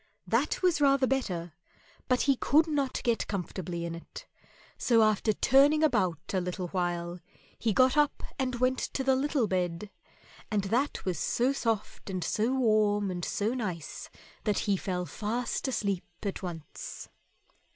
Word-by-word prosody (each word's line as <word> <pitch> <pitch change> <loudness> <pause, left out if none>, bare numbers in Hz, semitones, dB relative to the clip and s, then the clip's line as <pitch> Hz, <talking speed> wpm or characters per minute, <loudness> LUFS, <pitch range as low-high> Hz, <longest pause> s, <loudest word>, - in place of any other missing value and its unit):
That - - 0
was 345 -5 +3
rather 275 -1 +5
better, 185 -11 -2 0.5
but 250 -1 +2
he 275 -1 +3
could 300 +5 +4
not 285 -4 -1
get 235 -2 +1
comfortably 180 -3 -4
in 170 - -4
it, 170 - -9 0.5
so 230 -3 +4
after 215 0 +3
turning 280 +7 +4
about 210 - +1
a 190 - +2
little 180 0 -4
while 175 -1 -2 0.4
he 225 - +1
got 255 +6 +4
up 295 -1 +2 0.2
and 255 -2 0
went 255 +2 +1
to 265 - -2
the 265 0 +3
little 275 -2 +1
bed; 180 +1 -2 0.6
and 210 -2 0
that 245 +9 -1
was 180 -5 -1
so 250 +9 +1
soft 225 -6 -2
and 185 -2 -2
so 215 +8 0
warm 215 -5 +2
and 175 -1 -4
so 210 +7 -1
nice 185 - -5 0.3
that 210 -3 +1
he 200 - +2
fell 180 -1 -2
fast 235 +8 -2
asleep 200 -7 -1 0.2
at 200 -2 -3
once. 170 -4 -7
215 Hz, 155 wpm, -29 LUFS, 180-260 Hz, 0.6 s, rather